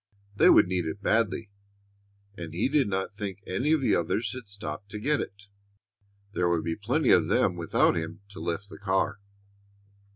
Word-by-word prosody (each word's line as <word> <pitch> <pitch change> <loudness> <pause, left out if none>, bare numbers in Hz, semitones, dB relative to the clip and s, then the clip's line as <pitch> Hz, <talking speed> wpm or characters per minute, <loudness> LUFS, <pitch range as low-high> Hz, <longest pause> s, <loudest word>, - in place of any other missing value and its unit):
They - - +6
would - - +7
need 90 -1 -1
it 90 +6 -5
badly, 110 -1 +1 0.8
and 85 -3 -7
he 95 - +2
did 145 -4 +3
not 95 0 -2
think 100 -1 -5
any 125 +11 0
of 160 -2 +3
the 130 - +2
others 105 +9 -1
had 125 -4 -8
stopped 100 -2 -7
to 105 - -6
get 145 +6 +1
it. 100 0 -8 0.9
There 90 -3 +1
would 85 -2 +1
be 80 0 -2
plenty 125 +8 +1
of 85 -4 +5
them 95 -1 +2
without 85 -2 +2
him 80 +5 -4
to - - -10
lift 85 +4 -3
the - - -11
car. 100 +1 0
100 Hz, 185 wpm, -27 LUFS, 85-110 Hz, 0.9 s, would